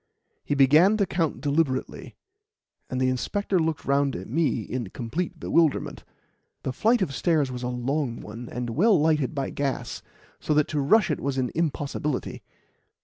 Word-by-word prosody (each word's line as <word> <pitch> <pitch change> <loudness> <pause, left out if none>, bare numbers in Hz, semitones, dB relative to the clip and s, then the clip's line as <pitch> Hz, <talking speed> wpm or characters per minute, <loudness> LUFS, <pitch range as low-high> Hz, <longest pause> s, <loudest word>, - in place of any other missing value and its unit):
He 145 - -1
began 155 +10 +5
to 200 - +2
count 165 -8 -1
deliberately, 145 -2 -1 0.7
and 130 - -2
the 130 - +2
inspector 185 +9 0
looked 160 -2 -1
round 140 0 +1
at 95 - -6
me 145 -2 0
in 120 -2 -4
complete 160 - -4
bewilderment. 165 -3 +1 0.6
The 130 - -2
flight 225 - +2
of 145 -7 -3
stairs 150 -4 +1
was 125 -1 -5
a 125 - -2
long 125 +1 -2
one, 115 +3 -8
and 120 -1 -4
well 195 - +4
lighted 155 -2 +1
by 140 - -2
gas, 140 -2 -3 0.4
so 150 - 0
that 150 -1 +3
to 150 -2 0
rush 200 +8 +4
it - - -1
was 140 -1 -2
an 130 -2 0
impossibility. 150 -3 -2
140 Hz, 165 wpm, -25 LUFS, 130-165 Hz, 0.7 s, began